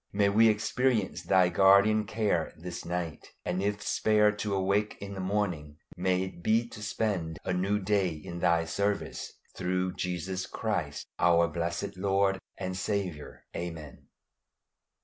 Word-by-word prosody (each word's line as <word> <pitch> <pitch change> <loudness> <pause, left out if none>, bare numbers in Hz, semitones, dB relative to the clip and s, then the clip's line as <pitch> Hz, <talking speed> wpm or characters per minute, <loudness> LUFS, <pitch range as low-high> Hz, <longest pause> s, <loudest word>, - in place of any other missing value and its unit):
May 100 0 +3
we 110 +3 +6
experience 110 0 +1
Thy 90 -2 +4
guardian 100 +4 +5
care 100 -6 0
this 85 +2 -7
night; 85 -3 -4 0.2
and 90 +1 -1
if 105 +1 -1
spared 105 -1 +3
to 105 -2 -1
awake 100 +2 +1
in 100 0 -7
the 95 - -6
morning, 95 -7 -2 0.2
may 90 +1 +1
it 95 -2 -7
be 115 +5 +2
to 105 - -10
spend 100 -6 -2
a 95 - 0
new 95 +3 +1
day 100 -2 +1
in 80 +2 -7
Thy 85 -1 +3
service, 100 +4 -2 0.2
through 90 0 -1
Jesus 90 +1 -3
Christ, 90 -10 -3
our 85 -1 +5
blessed 85 +4 -3
Lord 95 0 +2 0.2
and 95 0 -3
Saviour. 95 -6 -3
Amen. 80 -4 -7
95 Hz, 145 wpm, -29 LUFS, 85-105 Hz, 0.2 s, we